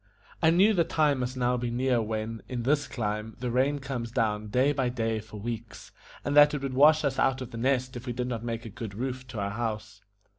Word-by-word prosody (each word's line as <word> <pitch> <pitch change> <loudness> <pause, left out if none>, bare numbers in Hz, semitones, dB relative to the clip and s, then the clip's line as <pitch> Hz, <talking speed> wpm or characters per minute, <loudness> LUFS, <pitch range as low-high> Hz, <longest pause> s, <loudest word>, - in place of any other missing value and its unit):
I 160 - +5
knew 190 +6 +5
the 175 -4 +3
time 150 -4 +1
must 125 +1 -3
now 125 0 +1
be 120 0 -2
near 125 0 +1
when, 110 +1 -3
in 125 -2 -3
this 145 +2 +1
clime, 105 -1 -3
the 125 0 -2
rain 135 +4 +2
comes 130 -4 -4
down 110 -3 -1
day 130 +7 +2
by 130 -3 0
day 115 -2 -1
for 110 0 -10
weeks, 115 +1 -6 0.3
and 145 - 0
that 145 0 +7
it 140 - -4
would 135 -1 -2
wash 150 +4 +6
us 135 -1 0
out 135 0 +2
of 130 -2 -7
The 115 - -6
Nest 130 0 0
if 120 +2 -8
we 120 - -2
did 125 +1 -2
not 120 -2 -4
make 115 0 -4
a - - -6
good 110 -3 -7
roof 130 +2 -4
to 125 -5 -6
our 100 0 -2
house. 105 -2 -4
125 Hz, 245 wpm, -28 LUFS, 115-135 Hz, 0.3 s, that